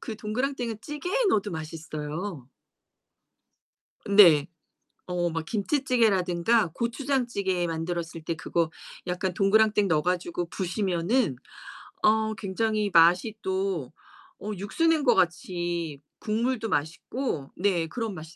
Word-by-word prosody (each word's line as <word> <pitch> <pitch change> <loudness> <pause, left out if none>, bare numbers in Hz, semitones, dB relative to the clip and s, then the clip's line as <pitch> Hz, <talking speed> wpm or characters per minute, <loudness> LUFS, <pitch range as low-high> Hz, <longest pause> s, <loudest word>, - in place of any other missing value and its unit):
그 225 -4 -6
동그랑땡은 235 +1 -2
찌개에 360 - -2
넣어도 205 -1 +1
맛있어요. 155 -1 -6 1.6
네. 170 -8 +7 0.6
어 175 -1 -1
막 165 0 -3
김치찌개라든가 215 - +2
고추장찌개 235 -7 -1
만들었을 165 0 -4
때 165 - -2
그거 165 0 -1 0.4
약간 180 +1 -1
동그랑땡 210 +1 +3
넣어 155 -2 +2
가지고 175 -1 -1
부수면은 185 - 0 0.7
어 220 0 +3
굉장히 215 +1 -1
맛이 175 +6 +5
또 190 -8 -2 0.5
어 210 - -5
육수 205 - -1
낸 320 -2 +3
것 240 - +5
같이 175 -4 -1 0.2
국물도 225 +2 -1
맛있고 160 - -3
네 180 -3 +1
그런 225 +4 -4
맛이 160 -1 -10
190 Hz, 255 characters per minute, -27 LUFS, 170-220 Hz, 1.6 s, 네